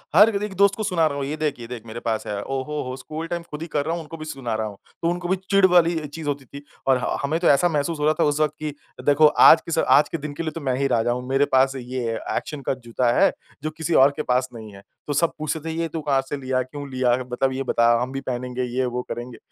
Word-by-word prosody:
हर 210 +5 +8
एक 210 -2 -4
दोस्त 200 +1 +4
को 220 - -3
सुना 180 -6 +2
रहा 140 -2 -3
हूँ 140 - -2
ये 145 +3 -3
देख 150 -4 -2
ये 115 - -8
देख 120 -2 -8
मेरे 115 +1 -7
पास 115 -2 -2
है। 100 -1 -3
ओहो 135 +3 -3
हो 130 - -4
स्कूल 155 +5 -6
टाइम 170 0 -3
खुद 150 +1 -6
ही 165 - -4
कर 145 -2 -1
रहा 165 - -1
हूँ 170 - -3
उनको 165 +1 -9
भी 155 - -7
सुना 135 -6 -4
रहा 110 0 -2
हूँ। 100 -2 -9 0.2
तो 170 - +1
उनको 175 0 -2
भी 190 - +2
चिढ़ 195 -1 +5
वाली 175 -2 +4
चीज़ 150 +1 -8
होती 140 -2 -2
थी, 140 +3 -11 0.2
और 130 - +5
हाँ 125 - -2
हमें 155 +4 0
तो 175 - +1
ऐसा 175 +5 +4
महसूस 155 +1 -1
हो 150 - 0
रहा 155 - +4
था - - +4
उस 145 0 +1
वक़्त 155 -1 +2
की 155 -1 -4 0.3
देखो 145 +2 +6
आज 160 +2 +7
के 165 - +2
आज 145 - +4
के - - -3
स - - -14
दिन 150 0 -5
के 155 - -4
लिए 160 - -2
तो 165 - -7
मैं 130 -3 0
ही 140 +1 +1
राजा 120 -1 +1
हूँ। 125 +1 -3
मेरे 135 +2 +3
पास 135 0 +3
ये 125 -2 -3
अ, - - -5
एक्शन 150 -2 -5
का 135 - -1
जूता 120 +1 +1
है 195 - +6 0.3
जो 155 - -1
किसी 160 +1 -3
और 135 0 +6
के 155 - -2
पास 125 -1 +1
नहीं 110 -2 -9
है। 100 - -12 0.3
तो 145 - -1
सब 165 +4 +2
पूछते 155 +1 -2
थे 160 +1 -5
ये 165 0 -1
तू 160 0 -4
कहाँ 140 -3 +1
से 135 +2 -5
लिया, 130 -1 -1
क्यों 140 +3 -7
लिया? 130 -2 +2 0.2
मतलब 130 +2 +1
ये 135 +1 -2
बता 120 -2 +3
हम 125 +1 -2
भी 135 0 -4
पहनेंगे 125 0 -3
ये 125 +1 -1
वो 125 0 -2
करेंगे। 120 0 -6
140 Hz, 300 wpm, -23 LUFS, 125-160 Hz, 0.3 s, हर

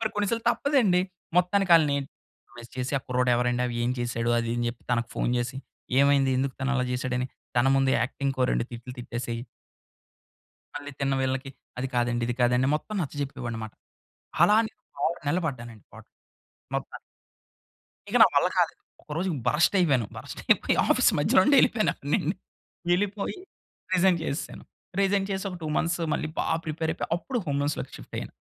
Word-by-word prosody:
మరి 220 - +1
కొన్నిసార్లు 215 +3 0
తప్పదండి. 240 -10 +3 0.4
మొత్తానికి 180 +1 +3
ఆళ్ళని 150 -3 +2 0.7
ఐస్ 120 - -13
చేసి 125 +2 -3
ఆ - - -10
కుర్రాడు 125 0 +1
ఎవరండి? 125 0 +1 0.2
ఏం 125 - +1
చేసాడు? 120 -1 -1
అది 115 0 -1
ఇది 120 - -1
అని 120 - 0
చెప్పి, 120 - -15
తనకు 115 -1 0
ఫోన్ - - 0
జేసి 120 +2 -3 0.4
ఏమైంది? 140 -1 +4
ఎందుకు 135 0 -1
తను 130 - 0
అలా 125 - +1
జేసాడు 125 0 -1
అని 125 - -1 0.3
తన 120 - +3
ముందు 135 -1 +3
యాక్టింగ్‌కి 135 +1 -2
ఓ - - +5
2 - - +1
తిట్లు 120 +1 -8
తిట్టేసేయి 120 -1 -4 1.3
మళ్ళీ 145 0 -6
తిన్న 135 0 +1
వీళ్ళకి 130 +1 -1 0.3
అది 130 +1 -2
కాదండి, 120 0 +1
ఇది 120 - -2
కాదండి 125 +2 +3
మొత్తం 215 +7 -5
నచ్చజెప్పేవాడినన్నమాట. 125 -7 -4 0.7
అలా 210 +4 +6
నేను 255 - -20 0.2
6 170 - 0
నెలలు 170 +5 +1
పడ్డానండి 120 -5 -7
పాట్లు, - - -14 0.6
మొత్తానికి. - - -5 1.1
ఇక - - -4
నా - - +8
వల్ల - - +5
కాలేదు. - - +1 0.2
ఒకరోజు 170 +5 -2 0.2
బరస్ట్ 170 +6 +3
అయిపోయాను. 135 -10 +2
బరస్ట్ - - -8
అయిపోయి - - +3
ఆఫీస్ - - +4
మధ్యలో 150 +5 +5
నుండే 285 +4 +5
ఎళ్ళిపోయాను 215 -3 +2
అప్పుడు 145 +1 -7
నేను. 160 +5 0 0.6
యెళ్ళిపోయి 200 - 0 0.6
రీజైన్ 185 -1 +4
చేసేసాను. 140 - -4 0.4
రీజైన్ 195 0 +2
చేసి 190 0 -2
ఒక 180 - -6
2 155 - -4
మంత్స్ 170 +2 0
మళ్ళీ 155 - -1
బా - - 0 0.2
ప్రిపేర్ 160 +1 -2
అయిపోయి. - - -4
అప్పుడు 245 +8 -3
హోమ్ 140 -2 -1
లోన్స్‌లోకి 145 +1 -2
షిఫ్ట్ - - -14
అయ్యాను. - - -6
140 Hz, 170 wpm, -27 LUFS, 125-175 Hz, 1.3 s, నా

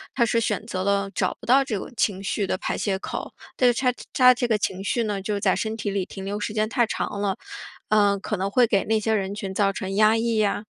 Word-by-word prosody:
它 235 - +3
是 230 +1 +1
选 225 -1 -1
择 185 -4 -3
了 200 0 +1
找 - - 0
不 - - -10
到 260 +3 +5
这 240 -6 -2
种 - - -7
情 195 -3 0
绪 200 0 -1
的 185 - -1
排 - - -3
泄 195 -2 -1
口， - - -6 0.2
但 250 -1 +5
是 - - -8
它 250 -2 +3 0.2
它 255 -1 +7
这 245 0 -1
个 220 -2 +2
情 190 -2 -2
绪 230 +4 0
呢， 205 -3 -2
就 200 +1 -2
在 - - +3
身 220 0 -2
体 215 -2 -3
里 195 -2 -1
停 195 0 -9
留 200 +2 -3
时 210 - -3
间 215 0 0
太 240 0 +2
长 205 - -3
了， 200 -2 0 0.5
呃， 205 -2 +4
可 205 +2 -3
能 190 +2 -1
会 245 +4 +4
给 205 -4 +1
那 220 +1 +2
些 220 +1 0
人 200 -1 -1
群 195 -2 -5
造 195 0 +2
成 195 0 -4
压 215 +1 +5
抑 225 0 0
呀、 205 -1 +1
210 Hz, 285 characters per minute, -24 LUFS, 195-225 Hz, 0.5 s, 它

